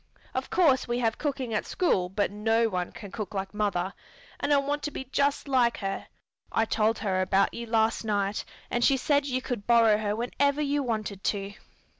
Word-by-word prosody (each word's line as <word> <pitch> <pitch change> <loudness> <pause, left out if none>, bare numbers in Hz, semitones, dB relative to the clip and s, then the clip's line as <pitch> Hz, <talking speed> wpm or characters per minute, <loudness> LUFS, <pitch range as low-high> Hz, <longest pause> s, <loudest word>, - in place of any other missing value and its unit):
Of 260 0 -3
course 295 -9 +3
we 240 0 0
have 225 -2 0
cooking 265 -5 -2
at 215 - 0
school 190 - +1
but 200 +2 0
no 225 +2 +2
one 180 -3 -2
can 205 -4 -10
cook 210 -2 -5
like 195 0 -3
mother, 195 -3 -1 0.5
and 285 - -1
I 290 - +6
want 285 +1 0
to - - -2
be 265 - -6
just 280 +2 0
like 250 -3 +3
her. 195 -1 -4 0.4
I 225 - +2
told 220 0 +1
her 190 -3 0
about 190 +1 +2
you 235 0 -6
last 225 0 +2
night, 205 -1 0 0.3
and 240 - +1
she 270 +1 +5
said 285 +2 +1
you 255 -1 -1
could 230 -5 -4
borrow 230 -3 +5
her 210 -1 -1
whenever 280 +5 0
you 290 -1 +1
wanted 215 -6 -3
to." 200 -1 -1
225 Hz, 200 wpm, -28 LUFS, 205-265 Hz, 0.5 s, I